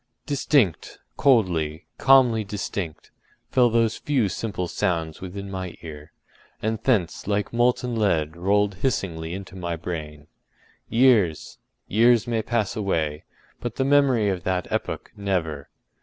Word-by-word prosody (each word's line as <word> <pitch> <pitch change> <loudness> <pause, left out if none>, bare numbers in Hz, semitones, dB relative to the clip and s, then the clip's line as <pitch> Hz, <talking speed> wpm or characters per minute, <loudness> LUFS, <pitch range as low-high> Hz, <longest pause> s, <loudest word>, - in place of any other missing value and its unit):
” - - -53
Distinct, 140 - +1 0.2
coldly, 85 - +2
calmly 125 -5 +5
distinct, 100 -5 -5 0.4
fell 125 -2 +4
those 115 -1 +1
few 130 -9 0
simple 95 -1 -3
sounds 80 -2 -2
within 100 +1 -7
my 95 -2 -5
ear, 75 -1 -9 0.5
and 110 0 -2
thence 100 -9 0
like 105 +1 -1
molten 120 0 +1
lead 80 -8 +1
rolled 100 +3 +1
hissingly 85 -11 -1
into 95 -1 -9
my 85 -2 -3
brain. 75 -3 -6 0.6
Years—years 115 - +2
may 115 -2 0
pass 110 -3 -1
away, 80 -8 -1 0.3
but 120 -2 -5
the 135 - 0
memory 135 -7 +3
of 95 -2 -2
that 90 -1 -1
epoch—never! 85 -8 -3
100 Hz, 125 wpm, -24 LUFS, 85-115 Hz, 0.6 s, calmly